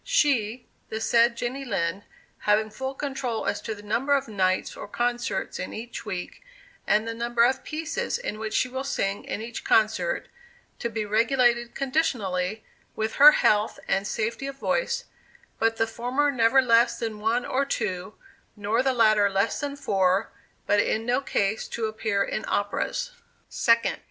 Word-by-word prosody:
She, 260 - +1 0.2
the 220 - -3
said 235 +1 +3
Jenny 255 +3 -3
Lind, 185 -6 -2 0.3
having 215 +1 +2
full 265 +4 -5
control 265 -5 -3
as - - -1
to 220 - -4
the 205 - -13
number 265 +7 +1
of 275 -1 -1
nights 185 -3 0
or - - -8
concerts 240 +2 -2
in - - -5
each 230 0 -7
week, 180 - -5 0.5
and 215 +2 +2
the 230 - -2
number 235 0 +1
of 260 +2 +2
pieces 330 +12 -3
in 345 - -5
which 220 0 -3
she - - +2
will 260 +1 -4
sing 200 -8 -2
in 215 - -4
each 230 0 -6
concert, 220 - +2 0.5
to 235 - -2
be 220 -1 -3
regulated 235 +2 +2
conditionally 220 - -1 0.3
with 220 0 -2
her 295 +2 +10
health 210 +1 +2
and 195 +1 0
safety 230 +5 -2
of 275 - -6
voice, 485 - -1 0.5
but 225 0 +2
the 225 - +2
former 250 +6 0
never 255 +1 +4
less 235 0 +4
than 225 -2 -4
one 225 +3 0
or 270 +2 +1
two, 210 -7 -3 0.4
nor 210 +3 0
the 265 0 +1
latter 215 -3 +4
less 195 +3 0
than 285 -1 -3
four; 195 -7 +1 0.3
but 205 - +3
in 220 +2 0
no 245 +3 +1
case 210 -5 -1
to 230 - -3
appear 215 -2 0
in - - -3
operas. - - -1 0.4
2d. 230 -1 +2
230 Hz, 165 wpm, -26 LUFS, 215-265 Hz, 0.5 s, her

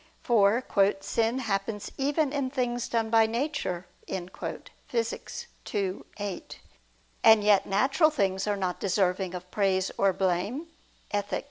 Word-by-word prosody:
For 225 0 +4 0.4
"sin 225 +4 0
happens 205 -3 -2
even 285 +1 +1
in 280 -3 0
things 245 -3 -1
done 225 -1 0
by 225 -1 +5
nature" 230 - -2 0.2
(Phys. 210 +5 -5 0.3
ii, 195 -2 -1 0.2
8). 205 -3 -6 0.6
And 220 -2 +7
yet 205 -2 +4
natural 270 - +3
things 195 -9 0
are 205 -1 +1
not 185 -2 -2
deserving 185 -1 0
of 180 0 -8
praise 195 -2 +1
or 195 0 +4
blame 195 - -1 0.4
(Ethic. 205 -1 -1
205 Hz, 125 wpm, -28 LUFS, 190-240 Hz, 0.6 s, And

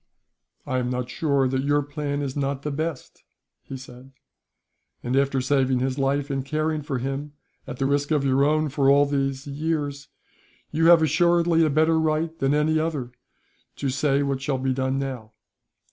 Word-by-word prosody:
"I 130 - -1
am 125 -1 -2
not 125 0 -3
sure 140 -3 +1
that 130 +1 -1
your 145 +1 +1
plan 145 0 -3
is 135 -2 -4
not 140 -1 -2
the 150 - -2
best," 155 0 -5 0.4
he 135 - -8
said, 130 +1 -13 0.9
"and 125 +2 -1
after 135 -1 +2
saving 130 -1 +1
his 130 +2 -1
life, 140 +1 0
and 135 -1 -2
caring 155 +2 -1
for 140 -2 -3
him, 135 +3 -4 0.3
at - - -6
the 135 - -1
risk 145 +1 0
of 150 -3 +1
your 135 +1 +3
own, 155 +1 +2
for 135 0 +2
all 140 +1 +5
these 135 -1 -2
years, 145 -1 -3 0.6
you 165 +2 +2
have 170 -2 +7
assuredly 170 +1 +3
a 155 - +3
better 160 +2 +3
right 160 +1 0
than 135 +2 +2
any 155 +1 +2
other 150 -6 -3 0.6
to 140 - -2
say 140 +1 +1
what 135 -1 -2
shall 135 -1 -1
be 130 0 -1
done 130 +1 -1
now. 130 -5 -5
140 Hz, 180 wpm, -24 LUFS, 135-155 Hz, 0.9 s, have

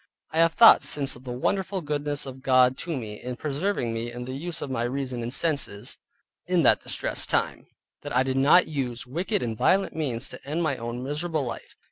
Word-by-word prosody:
I 160 - -1
have 165 0 +4
thought 230 - +8
since 140 -2 +3
of 125 +2 -15
the 125 - -5
wonderful 190 +9 -1
goodness 145 -1 -2
of 130 -1 -9
God 130 -1 +4
to 165 -4 -3
me 105 -4 -7
in 125 0 -5
preserving 145 - -2
me 115 +1 -4
in 125 +1 -7
the 130 - -6
use 160 +5 -5
of 140 - -5
my 120 -3 -1
reason 125 0 -3
and 115 +1 -4
senses 140 -9 0 0.5
in - - +2
that - - +5
distressed - - -2
time, - - -1 0.3
that - - -6
I 130 - +4
did 130 0 -2
not 145 +7 +5
use 125 -6 -3
wicked 180 - -2
and 115 -2 -3
violent 190 - +2
means 135 -6 -2
to - - -11
end 155 +5 -2
my 155 -4 0
own 120 0 -5
miserable 150 +1 -2
life. 120 - -7
135 Hz, 210 wpm, -26 LUFS, 125-160 Hz, 0.5 s, thought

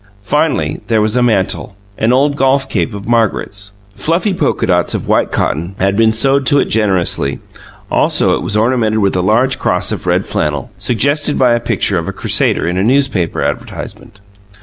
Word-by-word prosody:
Finally 150 +6 0
there 115 -2 +2
was 105 +2 +1
a 125 - +2
mantle, 105 -4 0 0.2
an 110 +2 +2
old 140 +3 +2
golf 135 0 +1
cape - - -1
of 100 +1 -8
Margaret's. 105 -3 -1 0.2
Fluffy 175 +5 0
polka 185 - 0
dots 90 -2 0
of - - -5
white - - +1
cotton 85 +6 -2
had 100 +1 0
been 110 +1 +3
sewed 135 +4 +1
to 145 - +4
it - - +3
generously; 95 -9 +1 0.5
also - - +2
it - - -4
was 100 +4 -1
ornamented 110 -1 +1
with 100 -3 +1
a 90 - +1
large 120 +7 +1
cross - - 0
of - - -5
red - - +1
flannel, 75 -3 -2
suggested 145 +5 0
by 125 -2 +3
the 120 - +1
picture 110 -5 0
of 80 - -6
a 95 - -4
Crusader - - +1
in 90 +1 -1
a - - +1
newspaper 125 -8 +1
advertisement. 100 - -6
110 Hz, 185 wpm, -14 LUFS, 100-135 Hz, 0.5 s, to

